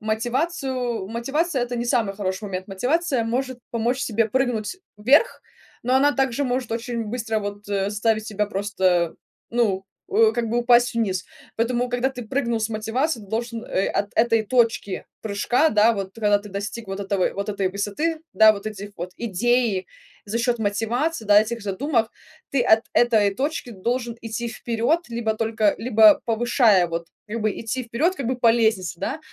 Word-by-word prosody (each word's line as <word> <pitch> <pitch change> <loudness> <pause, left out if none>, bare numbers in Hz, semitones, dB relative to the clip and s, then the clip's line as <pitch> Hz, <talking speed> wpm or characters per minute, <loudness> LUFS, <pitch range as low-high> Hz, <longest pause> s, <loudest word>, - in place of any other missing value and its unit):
мотивацию 245 - -2
мотивация- 270 +5 -1
это 245 0 -5
не 235 - -2
самый 225 -4 +1
хороший 190 0 -3
момент. 190 0 -5
Мотивация 260 - 0
может 255 +2 -2
помочь 240 +3 0
тебе 225 0 +1
прыгнуть 245 - -1 0.2
вверх, 275 - +3 0.4
но 250 +2 +1
она 290 +2 +4
также 270 0 0
может 250 -2 -2
очень 235 0 -3
быстро, 225 -1 -2
вот, 205 0 -6
э, 200 0 0
заставить 215 +1 0
тебя 210 0 -1
просто, 190 -4 0 0.4
ну, 210 -5 +1 0.2
у 220 +1 +4
как 240 -1 -1
бы, 240 +2 0
упасть 240 0 +4
вниз. 195 -6 -1 0.3
Поэтому, 240 +2 0
когда 245 +2 0
ты 250 -2 -7
прыгнул 235 -4 0
с 220 - 0
мотивации, 225 +5 -1
ты 200 - -14
должен, 230 +1 -3
э, 195 -5 0
от 205 - -1
этой 225 -1 +3
точки 225 -4 0 0.2
прыжка, 230 +8 +2
да, 215 +2 +5
вот, 195 -2 -5
когда 210 -2 +2
ты 205 +1 -11
достиг 200 +3 -5
вот 195 +1 -4
этого 195 -2 0
вот 200 +2 -4
этой 200 -2 0
высоты, 205 - -2 0.2
да, 220 0 +7
вот 205 0 -8
этих 205 -1 -6
вот 175 +2 -5
идей 235 -2 +1 0.4
за 215 +3 -2
счет 240 0 +1
мотивации, 225 +7 -1
да, 205 0 +7
этих 225 0 -3
задумок. 230 +3 0 0.4
Ты 275 - +1
от 220 -1 +4
этой 215 -4 +3
точки 285 0 -2
должен 235 +3 -2
идти 230 +1 -4
вперед 235 +7 0
либо 225 -2 -1
только, 220 -2 +1
либо 220 -2 +6
повышая, 225 -5 +3
вот, 170 0 -4 0.2
как 230 +1 -4
бы, 215 - +1
идти 240 +3 -3
вперед, 270 +11 0
как 270 - -4
бы, 255 +1 -1
по 235 -2 +4
лестнице, 220 -8 0
да. 300 - -2
225 Hz, 175 wpm, -23 LUFS, 205-245 Hz, 0.4 s, да